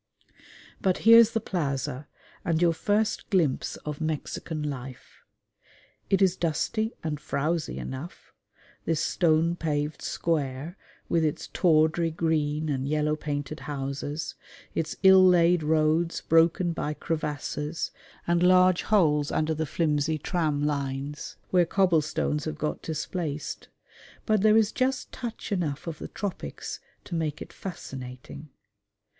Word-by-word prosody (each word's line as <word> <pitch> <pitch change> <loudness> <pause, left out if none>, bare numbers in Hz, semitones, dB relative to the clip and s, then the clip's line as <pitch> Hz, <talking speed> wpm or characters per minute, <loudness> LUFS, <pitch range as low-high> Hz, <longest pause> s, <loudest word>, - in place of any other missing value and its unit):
But 185 -2 +2
here's 230 0 +9
the 225 - +1
plaza, 140 - -3 0.4
and 165 -4 +1
your 170 -1 +4
first 210 +5 0
glimpse 170 -10 +1
of 150 0 -5
Mexican 155 0 -3
life. 135 -3 -7 0.9
It 195 0 +4
is 185 -1 +3
dusty 215 +7 -1
and 150 -2 -2
frowsy 155 +3 -2
enough 135 +7 -7 0.5
this 165 -2 +1
stone 165 0 +2
paved 150 -2 -2
square 150 0 -2 0.3
with 165 -1 +2
its 155 -2 -2
tawdry 160 -1 +3
green 155 -2 0
and 135 -2 -1
yellow 150 +1 +1
painted 150 0 -4
houses, 140 +2 -4 0.4
its 160 -1 -2
ill 190 0 +8
laid 175 -1 +5
roads 155 +2 +1
broken 165 +2 +3
by 150 -2 -3
crevasses 150 0 -3 0.3
and 170 0 +2
large 185 0 +5
holes 150 -8 +2
under 155 +1 +1
the 160 0 -2
flimsy 155 0 0
tram 155 -2 -1
lines 140 0 -3
where 180 -1 +5
cobble 180 -4 +3
stones 150 0 -2
have 155 -1 -4
got 150 0 -2
displaced; 160 -1 -4 0.6
but 215 -3 +2
there 215 +1 +5
is 220 -1 +3
just 255 0 -1
touch 235 -3 -6
enough 160 -7 -2
of 165 -3 -5
the - - -6
tropics 185 - -5 0.2
to - - -9
make 160 -3 -1
it - - -9
fascinating. 135 -4 -8
160 Hz, 130 wpm, -27 LUFS, 150-175 Hz, 0.9 s, here's